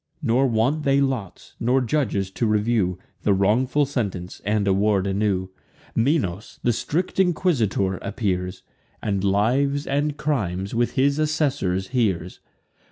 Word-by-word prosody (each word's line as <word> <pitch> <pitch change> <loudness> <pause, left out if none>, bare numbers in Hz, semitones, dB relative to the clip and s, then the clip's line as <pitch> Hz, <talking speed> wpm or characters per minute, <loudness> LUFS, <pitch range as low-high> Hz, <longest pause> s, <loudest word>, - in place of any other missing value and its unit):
Nor 130 +4 +3
want 125 +6 +1
they 140 -1 +3
lots, 130 -9 -3
nor 125 +3 +2
judges 115 -7 0
to 115 +4 -1
review 105 -4 +1 0.2
The 100 - +3
wrongful 125 +9 +2
sentence, 100 -10 -4
and 105 0 0
award 100 0 +2
a 100 - -1
new. 95 -2 0 0.5
Minos, 115 - 0
the 120 - +3
strict 175 - -2
inquisitor, 125 - +1
appears; 95 -3 -3 0.4
And 100 -2 -1
lives 130 +9 +2
and 145 +1 -1
crimes, 100 - -2
with 120 +1 +1
his 140 +2 +2
assessors, 135 - 0
hears. 95 -9 -1
110 Hz, 130 wpm, -23 LUFS, 95-140 Hz, 0.5 s, Nor